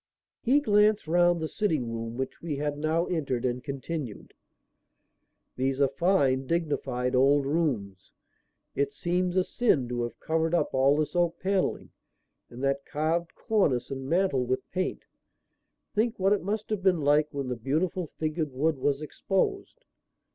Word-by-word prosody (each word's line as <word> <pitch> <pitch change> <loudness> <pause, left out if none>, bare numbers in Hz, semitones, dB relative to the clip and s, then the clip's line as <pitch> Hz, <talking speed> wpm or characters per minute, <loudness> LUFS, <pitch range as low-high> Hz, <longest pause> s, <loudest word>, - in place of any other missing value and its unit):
He 275 +5 +3
glanced 210 - +3
round 175 +1 +3
the 160 - -2
sitting 155 - -1
room, 115 +1 -5
which 130 0 -4
we 165 -3 -3
had 145 +1 -2
now 155 +3 0
entered, 135 -9 -2
and 125 0 -1
continued: 140 -4 -5 1.2
"These 135 +1 0
are 140 - +5
fine, 135 -4 +2
dignified 135 -6 -1
old 135 +2 +4
rooms. 130 - -2 0.6
It 140 0 0
seems 180 +4 -1
a 185 - +4
sin 170 - +1
to 120 -1 -2
have 120 0 -4
covered 160 +1 0
up - - 0
all 135 +2 +4
this 155 +3 -1
oak 175 -1 +1
panelling 190 0 -1 0.6
and 120 +3 -9
that 140 0 0
carved 165 +4 -1
cornice 140 - +1
and 135 0 -5
mantel 170 -6 +2
with 130 +1 -2
paint. 185 0 -2 0.9
Think 225 +2 +1
what 195 +1 +3
it 205 - 0
must 210 +3 -3
have 210 -3 -1
been 180 -4 +3
like 145 +1 +3
when 140 -2 -4
the 125 - -2
beautiful 155 +9 -1
figured 155 0 -3
wood 145 +3 0
was 140 +2 0
exposed." 195 - -2
150 Hz, 155 wpm, -28 LUFS, 135-175 Hz, 1.2 s, are